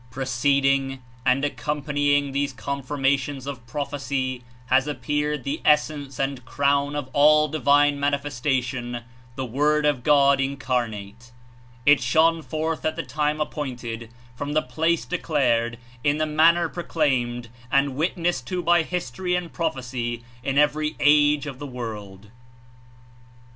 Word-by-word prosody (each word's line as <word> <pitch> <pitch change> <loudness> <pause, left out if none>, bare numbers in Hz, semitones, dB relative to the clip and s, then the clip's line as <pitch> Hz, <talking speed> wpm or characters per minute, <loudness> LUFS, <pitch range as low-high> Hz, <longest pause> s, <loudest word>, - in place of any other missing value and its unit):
Preceding 135 +2 +1 0.3
and 130 +3 +3
accompanying 145 -1 0
these 140 0 -1
confirmations 140 0 -1
46 - - -10
of 130 -4 -7
prophecy 130 -2 -3 0.2
has 130 +2 +2
appeared 150 0 -2
the 140 +4 -3
Essence 150 -2 +1
and 135 -2 -2
Crown 140 +2 +1
of 145 -3 -3
all 150 +1 +5
divine 145 -1 +3
manifestation, 130 -4 -1 0.3
the 130 -1 -3
Word 150 +5 +1
of 145 -4 +2
God 140 0 +4
Incarnate. 120 -5 -3 0.5
It 145 0 +6
shone 165 0 +3
forth 160 +1 -3
at 155 0 0
the 165 - -3
time 150 +3 -1
appointed, 120 -6 -4 0.3
from 145 +3 -4
the 155 - +2
place 160 +6 0
declared, 125 -9 0 0.3
In 145 0 +2
the 155 - +1
manner 165 +3 +4
proclaimed 130 -9 -1 0.2
and 140 -1 +2
witnessed 170 +3 -1
to 180 -2 -2
by 170 0 +4
history 180 +1 -2
and 180 -2 -4
prophecy 125 -6 -3 0.2
In 135 +2 -1
every 150 +1 +2
age 150 0 +4
of 135 -3 -7
the 145 - -6
world. 105 -5 -7
140 Hz, 130 wpm, -24 LUFS, 130-150 Hz, 0.5 s, It